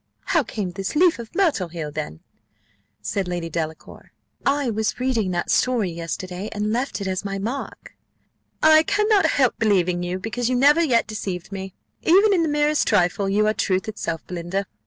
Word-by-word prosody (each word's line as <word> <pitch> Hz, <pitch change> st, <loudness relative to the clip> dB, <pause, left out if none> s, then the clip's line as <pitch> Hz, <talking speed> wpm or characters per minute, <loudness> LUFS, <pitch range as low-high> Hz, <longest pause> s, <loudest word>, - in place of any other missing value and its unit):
"How 330 Hz, -, +5 dB
came 210 Hz, -7 st, -4 dB
this 195 Hz, +6 st, -4 dB
leaf 340 Hz, -3 st, +4 dB
of 230 Hz, +4 st, -9 dB
myrtle 325 Hz, -, +2 dB
here, 165 Hz, -3 st, -6 dB
then?" 150 Hz, -, -6 dB, 0.8 s
said 185 Hz, -, -2 dB
Lady 175 Hz, -2 st, -4 dB
Delacour. 160 Hz, -1 st, -6 dB, 0.3 s
"I 280 Hz, -3 st, +1 dB
was 220 Hz, +2 st, -2 dB
reading 245 Hz, -6 st, 0 dB
that 175 Hz, -1 st, -1 dB
story 235 Hz, -8 st, +2 dB
yesterday, 180 Hz, +4 st, -5 dB
and 210 Hz, 0 st, -1 dB
left 250 Hz, -2 st, -2 dB
it 195 Hz, -, -3 dB
as 185 Hz, 0 st, -2 dB
my 195 Hz, -1 st, -3 dB
mark." 235 Hz, +8 st, -6 dB, 0.7 s
"I 315 Hz, 0 st, +7 dB
cannot 415 Hz, +3 st, +2 dB
help 260 Hz, -4 st, +1 dB
believing 180 Hz, -5 st, +2 dB
you, 175 Hz, +1 st, -2 dB
because 230 Hz, +5 st, -2 dB
you 255 Hz, -, +1 dB
never 290 Hz, +6 st, +5 dB
yet 245 Hz, -7 st, +2 dB
deceived 195 Hz, -4 st, -5 dB
me, 190 Hz, -1 st, -6 dB, 0.3 s
even 400 Hz, +5 st, +5 dB
in 355 Hz, -, +3 dB
the 325 Hz, -, +1 dB
merest 295 Hz, +1 st, +1 dB
trifle: 195 Hz, -1 st, +2 dB
you 210 Hz, +2 st, +2 dB
are 215 Hz, -, +2 dB
truth 190 Hz, -2 st, 0 dB
itself, 170 Hz, -7 st, -4 dB
Belinda. 180 Hz, +3 st, -3 dB
210 Hz, 180 wpm, -23 LUFS, 180-270 Hz, 0.8 s, I